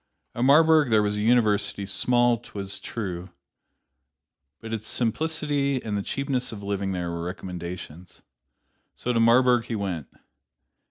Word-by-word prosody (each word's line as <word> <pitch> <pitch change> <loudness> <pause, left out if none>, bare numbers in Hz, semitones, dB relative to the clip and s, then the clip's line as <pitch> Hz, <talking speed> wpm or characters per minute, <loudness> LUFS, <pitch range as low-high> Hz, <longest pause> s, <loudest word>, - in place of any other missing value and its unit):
At 120 - -2
Marburg 155 0 +5
there 110 -2 +4
was 105 0 0
a - - -1
University, 105 -3 +2
small, 120 +5 +2
't - - -17
was 95 -1 -5
true, 95 -5 -5 1.3
but 115 0 -7
its 110 -1 -4
simplicity 145 +2 0
and 105 -2 -3
the 100 - -1
cheapness 130 +2 -2
of 105 -3 -8
living 100 -1 -2
there 90 -2 -3
were 85 0 -4
recommendations. 90 -1 -7 0.7
So 125 - -2
to 115 - +2
Marburg 120 +1 +4
he 120 - -4
went. 95 -8 -3
110 Hz, 145 wpm, -25 LUFS, 95-125 Hz, 1.3 s, Marburg